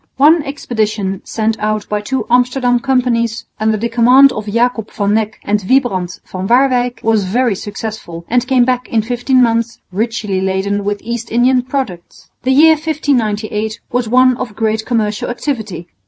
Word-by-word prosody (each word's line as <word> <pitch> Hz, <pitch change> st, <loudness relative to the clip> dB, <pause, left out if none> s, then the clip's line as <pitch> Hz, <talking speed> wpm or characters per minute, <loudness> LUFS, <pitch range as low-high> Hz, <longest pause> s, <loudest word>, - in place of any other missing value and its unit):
One 305 Hz, +5 st, +5 dB
expedition 215 Hz, -8 st, -3 dB
sent 225 Hz, 0 st, -1 dB
out 215 Hz, -1 st, -2 dB
by 210 Hz, 0 st, -2 dB
two 245 Hz, +2 st, -2 dB
Amsterdam 250 Hz, 0 st, +2 dB
companies 240 Hz, -3 st, 0 dB
under 215 Hz, 0 st, +1 dB
the 230 Hz, +3 st, -1 dB
command 250 Hz, +4 st, +5 dB
of 215 Hz, -3 st, -6 dB
Jacob 230 Hz, 0 st, 0 dB
van 205 Hz, -2 st, -1 dB
Neck 215 Hz, 0 st, -1 dB
and 210 Hz, 0 st, +1 dB
Wybrand 195 Hz, -10 st, 0 dB
van 185 Hz, +1 st, -5 dB
Waerwyck 245 Hz, -1 st, +2 dB
was 220 Hz, -3 st, +2 dB
very 235 Hz, +4 st, +1 dB
successful 205 Hz, -4 st, -7 dB
and 245 Hz, +1 st, 0 dB
came 255 Hz, -2 st, +3 dB
back 250 Hz, 0 st, -1 dB
in 225 Hz, -2 st, +1 dB
fifteen 250 Hz, +2 st, +2 dB
months 230 Hz, 0 st, 0 dB
richly 210 Hz, -1 st, -2 dB
laden 190 Hz, +2 st, -1 dB
with 205 Hz, 0 st, -3 dB
East 235 Hz, 0 st, -4 dB
Indian 250 Hz, +2 st, +3 dB
products. 250 Hz, -9 st, -6 dB
The 255 Hz, -, -2 dB
year 315 Hz, +4 st, +6 dB
1598 225 Hz, -9 st, -1 dB
was 245 Hz, -2 st, -1 dB
one 255 Hz, +1 st, +4 dB
of 240 Hz, -5 st, -6 dB
great 220 Hz, 0 st, -1 dB
commercial 215 Hz, -4 st, -1 dB
activity. 220 Hz, -, -4 dB
230 Hz, 160 wpm, -15 LUFS, 210-250 Hz, -, year